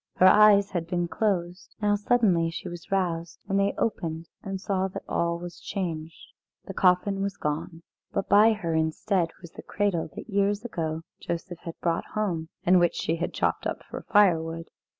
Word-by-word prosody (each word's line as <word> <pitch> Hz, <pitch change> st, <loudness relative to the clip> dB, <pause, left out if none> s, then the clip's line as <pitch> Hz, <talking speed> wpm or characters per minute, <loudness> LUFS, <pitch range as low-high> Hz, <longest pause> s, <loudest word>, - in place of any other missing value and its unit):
Her 185 Hz, -, +4 dB
eyes 205 Hz, 0 st, +7 dB
had 170 Hz, -3 st, -2 dB
been 175 Hz, -1 st, -1 dB
closed. 180 Hz, -2 st, -2 dB
Now 210 Hz, -1 st, +2 dB
suddenly 205 Hz, -6 st, +2 dB
she 165 Hz, -, -6 dB
was 175 Hz, -1 st, -8 dB
roused, 175 Hz, -4 st, -1 dB
and 195 Hz, 0 st, +1 dB
they 200 Hz, 0 st, +1 dB
opened 165 Hz, -7 st, -2 dB
and 195 Hz, -1 st, -4 dB
saw 190 Hz, -1 st, 0 dB
that 190 Hz, -, -7 dB
all 170 Hz, 0 st, 0 dB
was 175 Hz, 0 st, -8 dB
changed. 165 Hz, -5 st, -5 dB, 0.3 s
The 195 Hz, -, -7 dB
coffin 190 Hz, +2 st, +2 dB
was 200 Hz, -1 st, -2 dB
gone, 160 Hz, +3 st, -4 dB, 0.3 s
but -, -, -2 dB
by 215 Hz, +2 st, +6 dB
her 175 Hz, -6 st, -3 dB
instead 165 Hz, +3 st, +1 dB
was 170 Hz, -, -10 dB
the -, -, -10 dB
cradle 200 Hz, -6 st, -1 dB
that -, -, -8 dB
years 200 Hz, +1 st, 0 dB
ago 165 Hz, -7 st, -3 dB, 0.2 s
Joseph 170 Hz, 0 st, -5 dB
had 165 Hz, -, -7 dB
brought 170 Hz, -1 st, 0 dB
home, 175 Hz, -7 st, -1 dB, 0.2 s
and 180 Hz, +1 st, +6 dB
which 175 Hz, -1 st, +2 dB
she 165 Hz, -, -1 dB
had 170 Hz, -, -2 dB
chopped -, -, 0 dB
up -, -, -4 dB
for -, -, -5 dB
firewood. 165 Hz, -5 st, +3 dB
180 Hz, 180 wpm, -27 LUFS, 165-200 Hz, 0.3 s, eyes